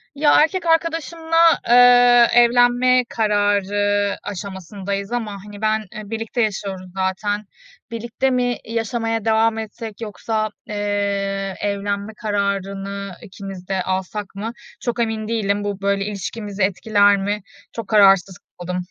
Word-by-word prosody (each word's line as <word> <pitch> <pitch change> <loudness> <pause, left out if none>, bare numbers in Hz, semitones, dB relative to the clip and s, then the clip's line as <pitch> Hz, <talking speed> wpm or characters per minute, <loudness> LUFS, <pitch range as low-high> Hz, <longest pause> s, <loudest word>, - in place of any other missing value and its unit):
Ya, 295 +1 +4
erkek 365 +1 -1
arkadaşımla, 330 0 0 0.3
eee, 245 0 +7
evlenme 245 +1 +4
kararı 205 -1 +1
aşamasındayız 200 +1 -5
ama 235 -3 -2
hani 205 0 -11
ben, 215 0 +2
eee, 215 -2 -8
birlikte 225 +2 -3
yaşıyoruz 195 -4 -3
zaten. 205 +2 -1 0.5
Birlikte 235 +3 -2
mi, 245 -1 0
i 225 - -9
yaşamaya 225 -1 -2
devam 225 0 +2
etsek 220 0 -7
yoksa, 215 0 -2 0.2
eee, 200 -1 -2
evlenme 200 +1 -2
kararını 200 -2 -3
ikimiz 195 -3 -9
de 190 -1 -1
alsak 190 +2 -4
mı? 215 +3 -4 0.3
Çok 240 0 -3
emin 220 -2 -1
değilim. 205 -3 0
Bu 200 -1 -4
böyle 200 0 0
ilişkimizi 205 0 -4
etkiler 205 +1 +3
mi? 205 +2 -2 0.3
Çok 230 -3 -6
kararsız 195 -3 +4 0.2
kaldım. 180 +1 -4
205 Hz, 125 wpm, -20 LUFS, 200-230 Hz, 0.5 s, eee